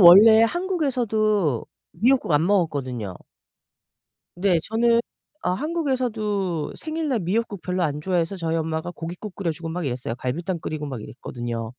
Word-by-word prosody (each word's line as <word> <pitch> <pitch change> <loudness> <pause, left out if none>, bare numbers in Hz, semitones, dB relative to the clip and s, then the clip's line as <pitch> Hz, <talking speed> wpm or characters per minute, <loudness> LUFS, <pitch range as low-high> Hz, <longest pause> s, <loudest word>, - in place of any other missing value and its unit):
원래 210 +5 +10
한국에서도 230 - +1 0.3
미역국 240 - +2
안 150 +3 +4
먹었거든요. 135 - 0 1.2
네. 180 -1 +3
저는 230 +1 +3 0.4
아 - - +1
한국에서도 215 - -1
생일날 310 -6 -2
미역국 200 +2 -1
별로 180 0 -1
안 150 -3 0
좋아해서 175 +2 0
저희 165 -2 -1
엄마가 160 +2 -2
고깃국 175 +4 -7
끓여 185 -4 -1
주고 165 +1 -7
막 170 -1 -3
이랬어요. 125 -2 -3
갈비탕 165 +9 -2
끓이고 155 -1 -4
막 130 -5 -5
이랬거든요. 120 -1 -5
180 Hz, 340 characters per minute, -24 LUFS, 155-225 Hz, 1.2 s, 원래